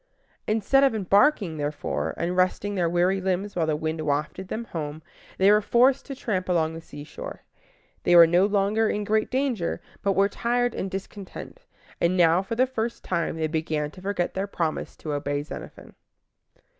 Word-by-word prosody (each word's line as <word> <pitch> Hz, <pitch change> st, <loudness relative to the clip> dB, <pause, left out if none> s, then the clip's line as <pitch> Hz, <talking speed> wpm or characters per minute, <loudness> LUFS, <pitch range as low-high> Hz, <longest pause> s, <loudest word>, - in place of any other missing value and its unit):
Instead 225 Hz, +6 st, +3 dB
of 270 Hz, -4 st, +3 dB
embarking, 200 Hz, -, +3 dB
therefore, 145 Hz, -, -3 dB
and 175 Hz, +2 st, -1 dB
resting 185 Hz, +3 st, +1 dB
their 175 Hz, -4 st, +1 dB
weary 180 Hz, +3 st, +2 dB
limbs 190 Hz, +2 st, -2 dB
while 165 Hz, -3 st, 0 dB
the 155 Hz, -, +1 dB
wind 160 Hz, +1 st, -3 dB
wafted 150 Hz, +5 st, -2 dB
them 225 Hz, +4 st, -4 dB
home, 155 Hz, -4 st, -6 dB, 0.3 s
they 195 Hz, +2 st, +5 dB
were 210 Hz, 0 st, +5 dB
forced 255 Hz, +5 st, +3 dB
to 275 Hz, -, -5 dB
tramp 190 Hz, -8 st, -2 dB
along 165 Hz, -2 st, +1 dB
the 165 Hz, -, -7 dB
seashore. 145 Hz, -2 st, -9 dB, 0.6 s
They 175 Hz, -, +3 dB
were 170 Hz, -1 st, +10 dB
no 175 Hz, +4 st, +3 dB
longer 210 Hz, +2 st, +1 dB
in 210 Hz, -, -1 dB
great 215 Hz, +1 st, +1 dB
danger, 255 Hz, -9 st, -1 dB, 0.2 s
but 200 Hz, -, +1 dB
were 195 Hz, +1 st, +3 dB
tired 240 Hz, +3 st, 0 dB
and 190 Hz, -, -3 dB
discontented, 195 Hz, -, -8 dB, 0.4 s
and 175 Hz, +2 st, +2 dB
now 170 Hz, 0 st, +5 dB
for 195 Hz, +4 st, -4 dB
the 255 Hz, +3 st, +4 dB
first 235 Hz, -2 st, -4 dB
time 170 Hz, -3 st, -1 dB
they 160 Hz, -, 0 dB
began 155 Hz, -1 st, -2 dB
to 185 Hz, -, -13 dB
forget 190 Hz, -2 st, -2 dB
their 195 Hz, +1 st, -2 dB
promise 165 Hz, -5 st, -3 dB
to 150 Hz, -, -5 dB
obey 145 Hz, 0 st, -2 dB
Xenophon. 150 Hz, -, -10 dB
185 Hz, 180 wpm, -25 LUFS, 160-210 Hz, 0.6 s, were